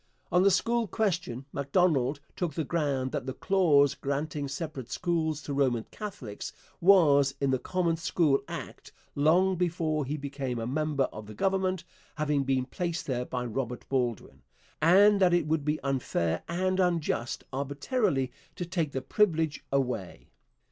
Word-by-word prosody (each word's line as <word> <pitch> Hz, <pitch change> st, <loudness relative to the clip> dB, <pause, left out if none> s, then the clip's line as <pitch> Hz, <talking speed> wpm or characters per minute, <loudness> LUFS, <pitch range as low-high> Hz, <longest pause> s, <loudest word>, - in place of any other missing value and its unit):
On 180 Hz, +1 st, +4 dB
the 195 Hz, -, +6 dB
school 230 Hz, +4 st, +1 dB
question 175 Hz, -, -1 dB
Macdonald 140 Hz, -2 st, +1 dB
took 170 Hz, -5 st, -2 dB
the 160 Hz, -, 0 dB
ground 140 Hz, -5 st, -1 dB
that -, -, -3 dB
the 130 Hz, -, -3 dB
clause 155 Hz, -8 st, +4 dB
granting 140 Hz, +1 st, -3 dB
separate 140 Hz, -3 st, -5 dB
schools 160 Hz, -1 st, -1 dB
to 145 Hz, -, -4 dB
Roman 130 Hz, -5 st, +1 dB
Catholics 140 Hz, -, -7 dB, 0.3 s
was 145 Hz, -7 st, +5 dB
in 140 Hz, -1 st, +1 dB
the 130 Hz, -, +1 dB
Common 170 Hz, 0 st, 0 dB
School 160 Hz, -3 st, +2 dB
Act -, -, -8 dB, 0.2 s
long 175 Hz, +6 st, +3 dB
before 160 Hz, -3 st, 0 dB
he 145 Hz, +4 st, -3 dB
became 140 Hz, -3 st, -4 dB
a 115 Hz, -, -3 dB
member 145 Hz, +2 st, 0 dB
of 105 Hz, 0 st, -8 dB
the 105 Hz, -, -9 dB
government 190 Hz, -, 0 dB, 0.3 s
having 150 Hz, -2 st, +1 dB
been 130 Hz, -1 st, 0 dB
placed 170 Hz, +5 st, -3 dB
there 125 Hz, -2 st, -2 dB
by 125 Hz, -1 st, -3 dB
Robert 125 Hz, +1 st, -4 dB
Baldwin 125 Hz, -4 st, -2 dB, 0.4 s
and 200 Hz, +5 st, +6 dB
that 180 Hz, -2 st, +5 dB
it 175 Hz, -, +1 dB
would 155 Hz, -1 st, 0 dB
be 150 Hz, +1 st, 0 dB
unfair 130 Hz, -11 st, -1 dB
and 185 Hz, +2 st, 0 dB
unjust 165 Hz, -9 st, 0 dB
arbitrarily 140 Hz, -, 0 dB, 0.2 s
to 175 Hz, -, -4 dB
take 165 Hz, -4 st, -2 dB
the 130 Hz, -, -3 dB
privilege 160 Hz, -1 st, +1 dB
away. 125 Hz, -9 st, -2 dB
150 Hz, 155 wpm, -29 LUFS, 135-175 Hz, 0.4 s, the